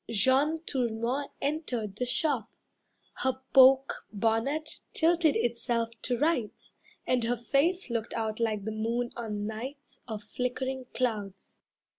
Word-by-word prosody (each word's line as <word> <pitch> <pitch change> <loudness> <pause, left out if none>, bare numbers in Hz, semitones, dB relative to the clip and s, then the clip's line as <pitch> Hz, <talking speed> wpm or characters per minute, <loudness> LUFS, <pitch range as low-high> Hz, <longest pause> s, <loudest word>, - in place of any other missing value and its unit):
Jeanne 265 +9 +3
Tourmont 245 +2 -1
entered 250 - -2
the 250 - -1
shop, 280 - +1 0.7
her 260 0 0
poke 265 0 +6
Bonnet 230 +9 0
tilted 330 -2 +3
itself 235 -1 0
to 245 - 0
rights, 260 -6 -1 0.3
And 250 -2 +2
her 240 +1 +1
face 280 - +1
looked 230 -1 -2
out 220 -1 -2
like 215 -3 0
the 220 - -2
moon 230 +3 -1
on 210 -3 -3
nights 255 +7 -7
Of 220 -3 -5
flickering 250 +3 -3
clouds. 210 -6 -3
245 Hz, 125 wpm, -29 LUFS, 225-275 Hz, 0.7 s, poke